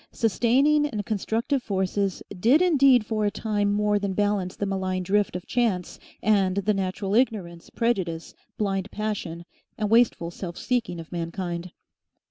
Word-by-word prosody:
Sustaining 260 Hz, +7 st, +3 dB
and 210 Hz, -7 st, -4 dB
constructive 230 Hz, +6 st, -1 dB
forces 195 Hz, -2 st, -1 dB, 0.2 s
did 245 Hz, -, +5 dB
indeed 275 Hz, -9 st, +5 dB
for 215 Hz, 0 st, -1 dB
a 205 Hz, -, +3 dB
time 205 Hz, -1 st, -1 dB
more 210 Hz, 0 st, +2 dB
than 200 Hz, -1 st, -2 dB
balance 205 Hz, -2 st, 0 dB
the 205 Hz, -, -2 dB
malign 190 Hz, -1 st, -2 dB
drift 200 Hz, +1 st, +1 dB
of 180 Hz, -, -5 dB
chance 215 Hz, -8 st, -1 dB, 0.2 s
and 195 Hz, -3 st, +3 dB
the 200 Hz, +2 st, +1 dB
natural 195 Hz, 0 st, -2 dB
ignorance, 205 Hz, -8 st, 0 dB
prejudice, 190 Hz, -9 st, -1 dB, 0.2 s
blind 195 Hz, -2 st, -1 dB
passion, 200 Hz, -6 st, -4 dB, 0.3 s
and 210 Hz, -1 st, -1 dB
wasteful 225 Hz, -7 st, +3 dB
self 175 Hz, -1 st, -7 dB
seeking 235 Hz, -9 st, -1 dB
of 165 Hz, -, -10 dB
mankind. 175 Hz, 0 st, -4 dB
205 Hz, 145 wpm, -25 LUFS, 185-225 Hz, 0.3 s, did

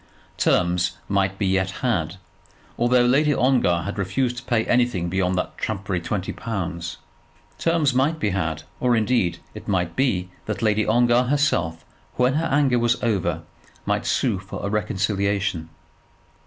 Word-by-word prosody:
Terms 90 Hz, 0 st, +2 dB
might 95 Hz, -1 st, 0 dB
be 100 Hz, -, -1 dB
yet 95 Hz, 0 st, +1 dB, 0.2 s
had, 85 Hz, -9 st, 0 dB, 0.6 s
although 120 Hz, +1 st, +3 dB
Lady 145 Hz, +4 st, +3 dB
Ongar 125 Hz, -10 st, +2 dB
had 100 Hz, +1 st, -5 dB
refused 120 Hz, +6 st, -1 dB
to 120 Hz, -, -6 dB
pay 115 Hz, -4 st, +1 dB
anything 120 Hz, -8 st, +1 dB
beyond 95 Hz, 0 st, 0 dB
that -, -, -2 dB
trumpery 100 Hz, -4 st, -2 dB
twenty 95 Hz, +1 st, -3 dB
pounds. 90 Hz, -6 st, -4 dB, 0.6 s
Terms 165 Hz, -5 st, +2 dB
might 140 Hz, +6 st, +2 dB
be 105 Hz, -10 st, 0 dB
had; 80 Hz, -5 st, -2 dB, 0.2 s
or, 125 Hz, -1 st, +2 dB
indeed, 110 Hz, -5 st, +1 dB, 0.2 s
it -, -, -10 dB
might 90 Hz, -3 st, 0 dB
be 95 Hz, -9 st, 0 dB, 0.2 s
that 110 Hz, +1 st, -3 dB
Lady 110 Hz, -1 st, +2 dB
Ongar 120 Hz, +2 st, +4 dB
herself, 125 Hz, -, 0 dB, 0.3 s
when 125 Hz, +1 st, +2 dB
her 160 Hz, +3 st, 0 dB
anger 135 Hz, -3 st, +2 dB
was 120 Hz, +1 st, +2 dB
over, 85 Hz, -8 st, 0 dB, 0.4 s
might -, -, -1 dB
sue 95 Hz, -, +1 dB
for 95 Hz, +1 st, -7 dB
a 100 Hz, -, -2 dB
reconciliation. 100 Hz, -4 st, -1 dB
105 Hz, 150 wpm, -23 LUFS, 90-125 Hz, 0.6 s, Ongar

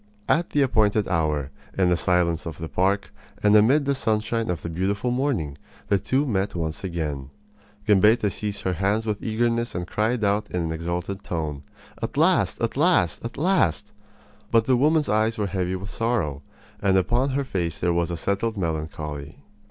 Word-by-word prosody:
At 170 Hz, +1 st, +2 dB
the 145 Hz, -, +2 dB
appointed 110 Hz, -4 st, +2 dB
hour, 75 Hz, -5 st, 0 dB, 0.3 s
in 90 Hz, -2 st, +3 dB
the -, -, +4 dB
silence 85 Hz, -2 st, +1 dB
of 80 Hz, -, -6 dB
the 80 Hz, -, -5 dB
park 100 Hz, +4 st, 0 dB, 0.3 s
and 105 Hz, 0 st, +5 dB
amid 130 Hz, +8 st, +5 dB
the 140 Hz, -, +2 dB
sunshine 110 Hz, -2 st, 0 dB
of 85 Hz, -3 st, -2 dB
the -, -, -3 dB
beautiful 100 Hz, +8 st, -1 dB
morning, 120 Hz, -, -1 dB, 0.3 s
the 100 Hz, -, +3 dB
two 130 Hz, +9 st, +1 dB
met 100 Hz, -7 st, -1 dB
once 80 Hz, 0 st, -3 dB
again. 75 Hz, -7 st, -3 dB, 0.6 s
Gambetta 105 Hz, +1 st, +4 dB
seized 100 Hz, +2 st, -4 dB
her 95 Hz, -, 0 dB
hands 100 Hz, +5 st, 0 dB
with 105 Hz, -2 st, -2 dB
eagerness 115 Hz, +1 st, 0 dB
and 90 Hz, 0 st, -2 dB
cried 110 Hz, +5 st, 0 dB
out 100 Hz, +1 st, +1 dB
in 90 Hz, -1 st, -2 dB
an 80 Hz, -, -2 dB
exultant 85 Hz, +4 st, -3 dB
tone: 75 Hz, -4 st, -3 dB, 0.4 s
"At -, -, -4 dB
last! -, -, +3 dB
At -, -, -1 dB
last! -, -, +3 dB
At 115 Hz, -, -6 dB
last!" 105 Hz, -, +1 dB, 0.6 s
But 115 Hz, -1 st, +3 dB
the 130 Hz, -, +3 dB
woman's 150 Hz, +4 st, +3 dB
eyes 110 Hz, +2 st, +1 dB
were 105 Hz, -, 0 dB
heavy 95 Hz, -1 st, -1 dB
with 95 Hz, +2 st, -6 dB
sorrow, 100 Hz, -, -1 dB, 0.4 s
and 95 Hz, -1 st, +3 dB
upon 120 Hz, +9 st, +1 dB
her 140 Hz, -, +1 dB
face 85 Hz, -, -2 dB
there 85 Hz, -1 st, +1 dB
was 85 Hz, 0 st, 0 dB
a 85 Hz, -, -3 dB
settled 105 Hz, +5 st, -1 dB
melancholy. 75 Hz, -4 st, -4 dB
100 Hz, 180 wpm, -24 LUFS, 85-115 Hz, 0.6 s, and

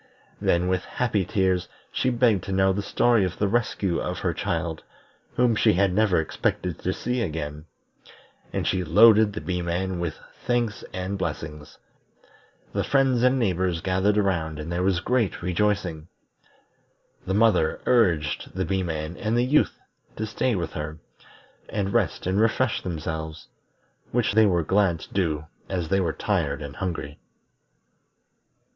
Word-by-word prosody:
Then 85 Hz, +1 st, +2 dB
with 95 Hz, 0 st, 0 dB
happy 110 Hz, -6 st, -1 dB
tears 95 Hz, -2 st, +1 dB, 0.2 s
she 130 Hz, -, +1 dB
begged 120 Hz, -6 st, +2 dB
to -, -, -5 dB
know 95 Hz, 0 st, +3 dB
the 100 Hz, -, -2 dB
story 115 Hz, +1 st, +2 dB
of 90 Hz, -1 st, -2 dB
the 100 Hz, -, +1 dB
rescue 100 Hz, -5 st, 0 dB
of -, -, -3 dB
her -, -, -1 dB
child, 80 Hz, -1 st, -2 dB, 0.5 s
whom 120 Hz, -2 st, +3 dB
she 110 Hz, -2 st, +3 dB
never 95 Hz, -1 st, +2 dB
expected 85 Hz, +2 st, -2 dB
to 95 Hz, -, -1 dB
see 125 Hz, +5 st, -2 dB
again; 75 Hz, -5 st, -4 dB, 0.9 s
and -, -, -2 dB
she 95 Hz, -1 st, +1 dB
loaded 105 Hz, +5 st, +6 dB
the 110 Hz, -, -5 dB
Bee 90 Hz, -1 st, -2 dB
man 90 Hz, +1 st, -2 dB
with 85 Hz, -3 st, -2 dB, 0.3 s
thanks 120 Hz, -4 st, 0 dB
and 95 Hz, +2 st, -4 dB
blessings. 75 Hz, -3 st, -5 dB, 1.0 s
The -, -, 0 dB
friends 135 Hz, -3 st, +2 dB
and 125 Hz, +1 st, +4 dB
neighbors 90 Hz, -6 st, 0 dB
gathered 95 Hz, +3 st, +1 dB
around 85 Hz, -6 st, 0 dB
and 75 Hz, +2 st, -6 dB
there 85 Hz, +1 st, -1 dB
was 90 Hz, -2 st, +1 dB
great 120 Hz, -7 st, 0 dB
rejoicing. 90 Hz, -3 st, 0 dB, 1.2 s
The 95 Hz, -, 0 dB
mother 105 Hz, -7 st, +3 dB
urged 90 Hz, -14 st, +1 dB
the 95 Hz, 0 st, -1 dB
Bee 95 Hz, -1 st, 0 dB
man 80 Hz, -1 st, -3 dB
and 115 Hz, +1 st, 0 dB
the 120 Hz, -, +3 dB
Youth 145 Hz, +4 st, +2 dB, 0.4 s
to 110 Hz, -, -3 dB
stay 110 Hz, +2 st, 0 dB
with 85 Hz, -4 st, -3 dB
her, 75 Hz, +1 st, -5 dB, 0.7 s
and 100 Hz, -2 st, -2 dB
rest 115 Hz, -7 st, 0 dB
and 95 Hz, +3 st, +1 dB
refresh 115 Hz, +2 st, +1 dB
themselves, 80 Hz, -2 st, -5 dB, 0.6 s
which 120 Hz, -3 st, +1 dB
they 110 Hz, 0 st, +6 dB
were 90 Hz, -3 st, +2 dB
glad 95 Hz, -1 st, +2 dB
to -, -, -12 dB
do 80 Hz, -6 st, 0 dB, 0.2 s
as 90 Hz, -4 st, -2 dB
they 95 Hz, +1 st, +2 dB
were 85 Hz, -4 st, +1 dB
tired 80 Hz, -5 st, -1 dB
and 70 Hz, 0 st, -8 dB
hungry. 85 Hz, -6 st, -4 dB
95 Hz, 155 wpm, -25 LUFS, 85-110 Hz, 1.2 s, loaded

